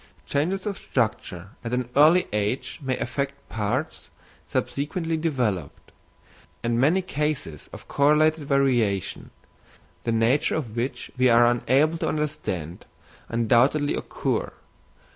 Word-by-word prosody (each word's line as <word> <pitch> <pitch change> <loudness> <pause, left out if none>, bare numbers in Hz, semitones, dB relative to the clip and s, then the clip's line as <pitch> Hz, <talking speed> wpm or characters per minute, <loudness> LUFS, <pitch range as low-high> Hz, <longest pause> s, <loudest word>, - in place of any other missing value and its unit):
Changes 180 +7 -1
of 200 -2 -3
structure 100 -6 -2
at 120 +1 -2
an 125 -1 -2
early 160 +6 +6
age 105 +9 -2
may 130 -2 -1
affect 140 +3 -2
parts 115 +7 -3 0.4
subsequently 160 +4 -2
developed; 130 - -2 0.7
and 120 0 +1
many 170 +8 +3
cases 150 - -3
of - - -11
correlated 150 +2 +3
variation, 120 -9 +1 0.7
the 115 - 0
nature 115 +5 +2
of 120 -9 -4
which 125 +1 -3
we 130 0 +5
are 120 0 +6
unable 135 +7 +2
to - - 0
understand, 120 - -3 0.4
undoubtedly 120 +6 +3
occur. - - -2
130 Hz, 115 wpm, -25 LUFS, 115-150 Hz, 0.7 s, early